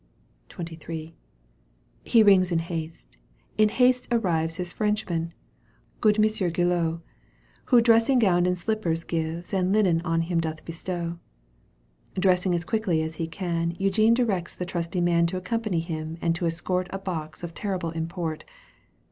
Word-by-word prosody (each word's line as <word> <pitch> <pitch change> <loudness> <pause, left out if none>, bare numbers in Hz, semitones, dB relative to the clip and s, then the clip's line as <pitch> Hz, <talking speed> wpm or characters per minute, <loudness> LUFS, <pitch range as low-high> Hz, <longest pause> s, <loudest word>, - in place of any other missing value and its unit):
XXIII. 165 -1 -7 0.9
He 230 -2 +5
rings 190 -3 +5
in 170 - +2
haste; 165 -1 -5 0.4
in 215 0 +4
haste 250 +2 +3
arrives 165 -8 +1
His 180 -1 -5
Frenchman, 200 -6 -1 0.7
good 210 -1 +3
Monsieur 215 -4 +2
Guillot, 170 -1 0 0.6
Who 245 -3 +5
dressing 230 +3 +4
gown 180 -6 +3
and 180 0 +1
slippers 175 -4 -1
gives 165 +2 -3
And 185 -1 +1
linen 190 -6 +3
on 165 -1 0
him 170 0 0
doth 160 -1 -5
bestow. 170 0 -4 1.0
Dressing 185 -1 +2
as 170 0 -2
quickly 190 -8 0
as 160 0 -5
he 165 - -2
can, 170 -1 -2
Eugene 215 +4 +3
directs 200 -8 -1
the 180 - -4
trusty 175 0 -2
man 170 -1 +3
To 185 +2 -3
accompany 190 -1 -1
him 160 -1 -5
and 165 -1 +1
to 170 0 -1
escort 180 +2 -1
A 195 - -4
box 165 -6 -5
of 170 -1 -5
terrible 185 -5 -3
import. 165 -1 -4
175 Hz, 150 wpm, -26 LUFS, 165-195 Hz, 1.0 s, He